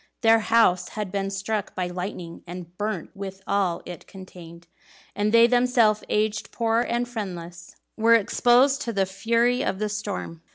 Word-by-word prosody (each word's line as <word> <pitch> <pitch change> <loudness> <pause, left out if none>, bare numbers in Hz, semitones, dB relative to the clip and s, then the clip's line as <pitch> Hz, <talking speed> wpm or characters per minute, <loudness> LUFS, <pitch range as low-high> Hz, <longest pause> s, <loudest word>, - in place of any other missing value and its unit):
Their 225 -1 +5
house 225 -5 +3
had 210 -3 -5
been 195 0 -2
struck 200 +1 -3
by 185 - -1
lightning, 180 -1 -6
and 175 0 -9
burnt 210 +2 -4
with 195 -1 -8
all 195 -4 0
it 175 -3 -9
contained; 175 -3 -12 0.5
and 210 +1 0
they 230 0 +7
themselves, 245 -3 +3
aged, 210 0 -1
poor, 230 0 +1
and 240 0 -1
friendless, 175 -6 -7 0.2
were 230 +1 +5
exposed 245 +5 +3
to 230 - -3
the 195 -2 +1
fury 230 +6 +1
of - - -1
the 210 +1 -2
storm. 205 -5 -5
210 Hz, 160 wpm, -24 LUFS, 185-230 Hz, 0.5 s, they